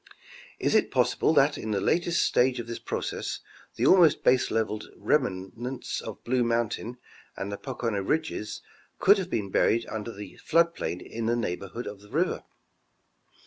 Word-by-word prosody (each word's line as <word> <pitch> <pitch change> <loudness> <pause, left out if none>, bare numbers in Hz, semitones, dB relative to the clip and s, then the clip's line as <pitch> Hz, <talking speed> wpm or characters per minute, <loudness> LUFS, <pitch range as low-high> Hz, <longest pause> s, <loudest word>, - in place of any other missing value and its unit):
Is - - 0
it - - +3
possible - - +2
that - - +4
in 110 - -5
the 105 -2 +1
latest 170 - +2
stage 125 0 +2
of 120 - -4
this 115 0 -6
process, - - -3 0.4
the - - 0
almost 175 -5 +6
baselevelled 110 -4 +2
remnants 125 0 -1
of - - -8
Blue 125 0 +1
mountain 115 0 -1 0.4
and 100 +1 -4
the 100 - -4
Pocono 115 -5 -3
ridges 110 -3 -2 0.3
could 200 +1 +5
have 185 -2 -4
been 100 - -2
buried 115 +4 +3
under 110 +1 -5
the 100 -3 -10
flood 170 0 +3
plain 90 - -4
in 115 0 -4
the 120 - +2
neighborhood 100 +1 -4
of 100 -1 -7
the 105 - -16
river - - 0
115 Hz, 160 wpm, -27 LUFS, 105-130 Hz, 0.4 s, almost